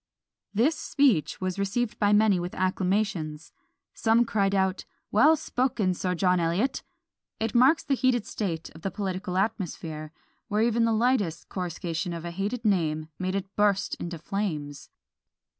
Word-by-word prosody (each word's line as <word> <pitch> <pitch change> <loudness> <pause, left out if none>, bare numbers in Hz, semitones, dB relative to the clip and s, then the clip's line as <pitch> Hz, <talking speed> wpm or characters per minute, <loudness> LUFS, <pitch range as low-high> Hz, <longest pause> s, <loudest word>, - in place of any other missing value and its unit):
This 250 +10 +2
speech 240 - +1
was 185 0 -3
received 210 +4 -1
by 205 -1 +3
many 210 -3 +4
with 175 +1 -5
acclamations; 185 -4 -1 0.4
some 230 +1 +3
cried 200 -3 +1
out, 190 -1 +1 0.3
"Well 315 +2 +6
spoken, 245 -10 0
Sir 180 0 -2
John 180 +1 +2
Eliot!" 175 +11 0 0.6
It 225 0 -1
marks 260 +7 +5
the 285 - 0
heated 255 -4 +2
state 170 -6 -4
of 160 - -14
the 195 - -2
political 190 -1 -3
atmosphere, 165 -7 -3 0.4
where 215 0 +1
even 235 0 +2
the 230 - +2
lightest 220 -7 +1
coruscation 175 -1 -3
of 170 0 -6
a 170 - -4
hated 205 +6 -3
name 155 -6 +1
made 185 +1 -1
it 195 0 -4
burst 205 -2 +2
into 170 0 -5
flames! 155 -5 -4
195 Hz, 150 wpm, -27 LUFS, 175-225 Hz, 0.6 s, Well